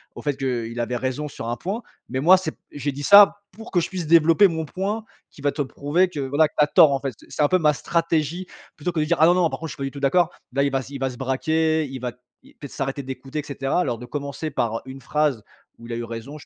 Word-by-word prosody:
au - - -8
fait 145 -2 -2
qu'il 120 -3 -3
avait 120 +1 -1
raison 130 +4 -3
sur 115 - -7
un 120 - -2
point. 205 +6 -4 0.3
Mais 130 - -2
moi, 180 +7 +7
c'est 160 -4 -3
p - - -25
j'ai 145 0 -3
dit 145 - -7
ça 205 +2 +7
pour 225 +1 -12
que 175 - +3
je - - -3
puisse 185 -3 -4
développer 165 +4 +6
mon 160 -3 -3
point 200 +7 -3 0.3
qui 140 - -15
va 145 0 +1
te 150 - -3
prouver 145 +7 +1
que 155 - -6
voilà, 140 +3 +2
que - - -25
tu 150 - +6
as - - +2
tort, 155 -4 +6
en 135 - 0
fait. 135 -4 -4
Ce - - -17
c'est - - -3
un - - +5
peu 185 - +4
ma 150 -3 +3
stratégie 165 +4 -1 0.3
plutôt 165 +4 -3
que 160 - -2
de 150 - +2
dire: 170 +2 +1
«Ah 160 - +7
non 175 - +6
non 175 -3 +3
par - - -6
contre, 160 - -5
je - - -6
suis - - -15
pas 140 - -4
du 135 - -3
tout 140 - -8
d'accord». 165 +5 +3 0.2
Là, 140 - +1
il 140 - +1
va 135 - +1
s 130 - -9
il 140 - -6
va 135 -1 0
se 125 - -9
braquer, 155 +4 +1
il 130 -1 -6
va 125 0 -3 0.3
y - - -19
peut-être 145 - -10
s'arrêter 135 +1 -3
d'écouter 135 +2 -6
et 150 - -3
cetera. 140 +2 -2
Alors 120 -7 -1
de 125 - -9
commencer 140 +3 -5
par, 115 -3 -1
heu, - - -8
une 135 +1 -9
phrase 150 -6 0 0.4
où 115 - -11
il 120 - -5
a - - -2
eu 120 - -4
raison, 115 +6 -7
je - - -14
145 Hz, 305 wpm, -23 LUFS, 130-165 Hz, 0.4 s, moi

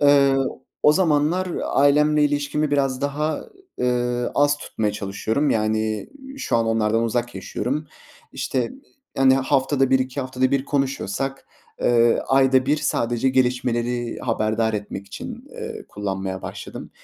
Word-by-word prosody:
eee, 140 -1 +5 0.5
o 150 - +7
zamanlar 170 +1 +2 0.2
ailemle 150 +2 +4
ilişkimi 145 +1 0
biraz 135 -2 +1
daha, 150 +2 -1 0.3
eee, 125 0 0
az 145 0 +3
tutmaya 105 -6 -2
çalışıyorum. 105 +7 -1
Yani, 110 0 0 0.3
şu 195 - 0
an 115 -1 +1
onlardan 115 0 +1
uzak 120 +1 -1
yaşıyorum. 145 +5 -3 0.5
İşte, 125 -3 -2 0.5
hani, 135 0 +5
haftada 135 0 +1
1-2 130 +1 +1
haftada 130 0 0
1 140 -1 +1
konuşuyorsak, 135 -2 -2 0.3
eee, 120 -1 +4
ayda 130 -1 +4
1 150 - +3
sadece 120 -4 0
gelişmeleri 125 -2 0
haberdar 110 -1 0
etmek 100 -1 -5
için, - - -8
eee, - - -7
kullanmaya 95 -2 -4
başladım. - - -8
130 Hz, 125 wpm, -22 LUFS, 115-145 Hz, 0.5 s, o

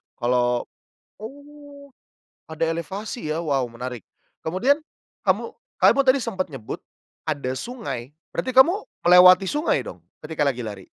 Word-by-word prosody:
Kalau 120 0 +1 0.5
oh, 285 +4 -12 0.6
ada 160 +1 -2
elevasi 190 +4 -4
ya, 165 +2 -2
wow 140 -3 +1
menarik. 120 0 -6 0.4
Kemudian 245 - +1 0.4
kamu - - 0 0.2
kamu 275 - +5
tadi 265 0 +5
sempat 190 -6 -3
nyebut 135 -7 -7 0.5
ada 140 -4 -1
sungai, 140 - -6 0.2
berarti 255 +9 -3
kamu 285 +6 +8 0.3
melewati 180 +2 +8
sungai 240 - 0
dong 90 - -9 0.2
ketika 150 -2 0
lagi 125 -3 -3
lari? 100 -3 -7
165 Hz, 125 wpm, -23 LUFS, -, 0.6 s, kamu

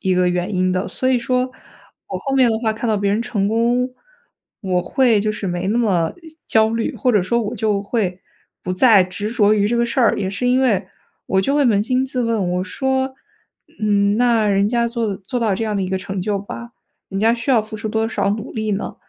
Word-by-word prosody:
一 190 -2 +1
个 180 0 +2
原 180 +3 -2
因 185 0 +1
的。 185 +1 -1
所 255 - -2
以 260 -1 +3
说 250 +2 0 0.6
我 - - -3
后 275 -2 -3
面 260 -3 +5
的 220 - +1
话 220 -2 +1
看 225 +2 -4
到 215 - +2
别 200 0 0
人 210 - +1
成 205 -4 -1
功， 240 +3 +1 0.7
我 185 -2 0
会 230 +5 +2
就 215 +1 0
是 210 - -5
没 175 +1 -2
那 215 - +1
么 180 -8 +1 0.3
焦 220 0 +3
虑， 230 0 -2
或 255 - +1
者 210 - +3
说 235 +6 0
我 215 +2 -4
就 205 -2 0
会 200 -4 -2 0.4
不 185 - -3
再 210 0 +6
执 185 +3 -4
着 215 -3 +3
于 205 -1 +2
这 235 +3 0
个 235 - +2
事 235 +3 -3
儿。 235 - +3
也 190 -2 -2
是 225 +5 -2
因 255 +1 +3
为 220 -8 +1 0.4
我 190 - +2
就 275 +8 0
会 290 - +3
扪 210 -5 +3
心 255 +2 +1
自 255 -2 -2
问， 225 -6 0
我 180 0 0
说： 265 +6 -1 0.7
“嗯， 205 -1 +2
那 235 -2 +3
人 200 0 +2
家 235 0 +1
做 230 -4 -2
做 200 +6 -4
到 220 -3 +1
这 225 - -2
样 215 -1 -2
的 195 - 0
一 185 - -2
个 190 0 -1
成 190 0 -5
就 205 0 -1
吧， 235 +4 -8 0.4
人 195 - -4
家 225 +2 +4
需 235 +3 -3
要 240 -4 +5
付 215 +1 -8
出 215 +1 -4
多 220 +1 0
少 200 -3 0
努 215 +4 -4
力 215 -2 -2
呢？ 205 0 -3
215 Hz, 260 characters per minute, -20 LUFS, 195-235 Hz, 0.7 s, 再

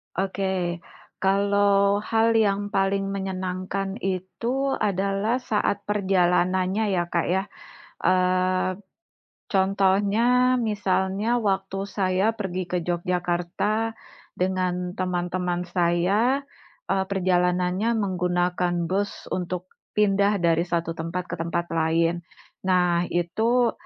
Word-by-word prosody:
Oke. 190 -2 -1 0.4
Kalau 200 +1 +3
hal 225 +1 +2
yang 205 -1 +1
paling 195 0 +1
menyenangkan 190 +1 -3
itu 230 +9 -2
adalah 200 +2 0
saat 205 -3 0
perjalanannya 185 0 +2
ya 175 - +1
Kak 170 - +1
ya, 190 +2 +1 0.6
eee, 185 0 +2 0.7
contohnya, 200 +6 +3
misalnya 205 -2 0 0.2
waktu 195 0 -1
saya 195 +1 +1
pergi 185 -3 -2
ke 180 - +1
Jogjakarta 180 +5 -1 0.5
dengan 180 -1 -1
teman-teman 180 -1 -2
saya, 185 +9 +2 0.5
eee, 190 0 +1
perjalanannya 180 +2 +1
menggunakan 180 -2 0
bus 200 +3 0 0.2
untuk 180 0 -3 0.3
pindah 200 0 +3
dari 170 -1 +3
satu 170 -2 -2
tempat 170 +2 -4
ke 170 - -4
tempat 170 +1 -2
lain. 165 +1 +1 0.4
Nah, 180 -2 +3
itu 225 +8 +1
190 Hz, 95 wpm, -25 LUFS, 180-200 Hz, 0.7 s, Kalau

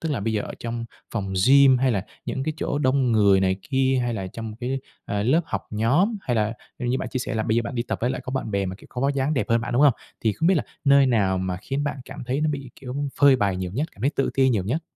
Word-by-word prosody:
Tức 160 -2 -2
là 135 - -2
bây 110 +2 -1
giờ 105 -2 0
ở - - -7
trong 115 0 -4 0.3
phòng 100 -4 -2
gym, 135 -1 +7
hay 130 -1 +2
là 95 -3 -1 0.2
những 135 - -3
cái 155 +2 -2
chỗ 145 - -2
đông 130 -3 +2
người 100 -3 +5
này 95 0 +2
kia, 130 -1 +2
hay 120 -1 -1
là 95 -3 -4
trong 110 +3 -7
cái, 130 +2 -1 0.3
ờ, 100 0 -2
lớp 135 +10 +3
học - - -4
nhóm, 140 - +2
hay 125 -9 -2
là 110 0 +1 0.3
như 125 +1 -1
bạn - - -4
chia 130 - -3
sẻ 120 - -3
là 110 - 0
bây 110 +1 0
giờ 120 - +2
bạn 130 - -5
đi 120 - 0
tập - - -4
với 125 - +1
lại 130 -1 -3
có - - -5
bạn 130 -4 -3
bè, 100 -1 0
mà, 95 - -4
kiểu, - - -16
có 125 - -5
vóc 140 +1 +1
dáng 140 +3 0
đẹp 130 - 0
hơn 115 0 +3
bạn, 120 - -4
đúng 125 +4 +3
hông? 145 -5 +6 0.3
Thì 110 - +1
không 160 +10 -1
biết 190 - +5
là 155 - +1 0.2
nơi 140 -1 +6
nào 100 -6 +2
mà 90 -1 -2
khiến 140 +2 -2
bạn 145 - -2
cảm 135 -1 -8
thấy 130 +4 -1
nó 155 - +1
bị, 140 -4 -5
kiểu, 130 -2 -6 0.3
phơi 140 -2 +7
bày 100 -6 0
nhiều 90 -1 -3
nhất, 145 +9 -1
cảm - - -18
thấy 135 +5 +2
tự 135 -2 -1
ti 135 -1 +4
nhiều 110 -7 +1
nhất? 135 - -1
125 Hz, 305 wpm, -24 LUFS, 110-140 Hz, 0.3 s, gym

